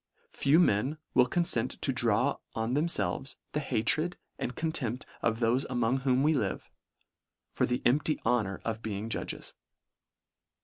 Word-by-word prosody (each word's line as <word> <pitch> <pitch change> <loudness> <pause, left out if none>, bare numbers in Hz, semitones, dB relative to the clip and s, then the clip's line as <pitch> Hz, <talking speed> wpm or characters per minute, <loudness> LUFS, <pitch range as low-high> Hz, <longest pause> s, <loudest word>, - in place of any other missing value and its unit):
Few 145 +4 +3
men 135 - +2 0.2
will 125 -1 +5
confent 175 +6 +1
to - - +1
draw - - +2 0.2
on 115 +2 -1
themfelves 135 - 0 0.2
the 150 - -1
hatred 150 +6 0 0.2
and 125 - -3
contempt 130 -7 -2 0.2
of 115 0 0
those 120 +3 +2
among 120 0 +1
whom 130 0 +2
we 155 +2 +4
live, 145 - -2 0.8
for - - +1
the 125 +1 -1
empty 150 +5 +2
honour 110 -5 +1
of 110 -1 -2
being 110 0 -4
judges. - - -4
125 Hz, 140 wpm, -30 LUFS, 115-150 Hz, 0.8 s, will